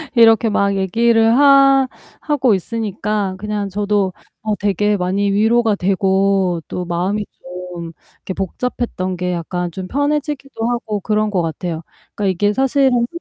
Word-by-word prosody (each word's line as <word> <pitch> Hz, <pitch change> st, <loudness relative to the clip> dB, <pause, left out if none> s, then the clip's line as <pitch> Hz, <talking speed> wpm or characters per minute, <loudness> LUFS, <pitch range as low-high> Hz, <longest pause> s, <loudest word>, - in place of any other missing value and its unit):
이렇게 225 Hz, -1 st, +6 dB
막 200 Hz, -1 st, +1 dB
얘기를 225 Hz, +4 st, +3 dB
하 275 Hz, -1 st, +6 dB, 0.3 s
하고 270 Hz, -6 st, +1 dB
있으니까 210 Hz, -1 st, -2 dB
그냥 210 Hz, -1 st, -3 dB
저도 205 Hz, -1 st, 0 dB, 0.3 s
어 215 Hz, -1 st, -1 dB
되게 205 Hz, +1 st, +1 dB
많이 195 Hz, +2 st, 0 dB
위로가 220 Hz, +1 st, +3 dB
되고 190 Hz, -1 st, +1 dB
또 180 Hz, -, -4 dB
마음이 185 Hz, +4 st, -1 dB, 0.5 s
좀 170 Hz, -1 st, -7 dB, 0.2 s
이렇게 190 Hz, -, -6 dB
복잡했던 195 Hz, -1 st, -3 dB
게 180 Hz, 0 st, -2 dB
약간 175 Hz, +1 st, -3 dB
좀 185 Hz, +2 st, -6 dB
편해지기도 285 Hz, -, -2 dB
하고 225 Hz, -3 st, -2 dB
그런 215 Hz, +2 st, 0 dB
것 185 Hz, -3 st, +1 dB
같아요. 165 Hz, 0 st, -4 dB, 0.3 s
그러니까 210 Hz, -, -2 dB
이게 205 Hz, +3 st, +1 dB
사실은 265 Hz, -1 st, +2 dB
205 Hz, 300 characters per minute, -18 LUFS, 185-235 Hz, 0.5 s, 이렇게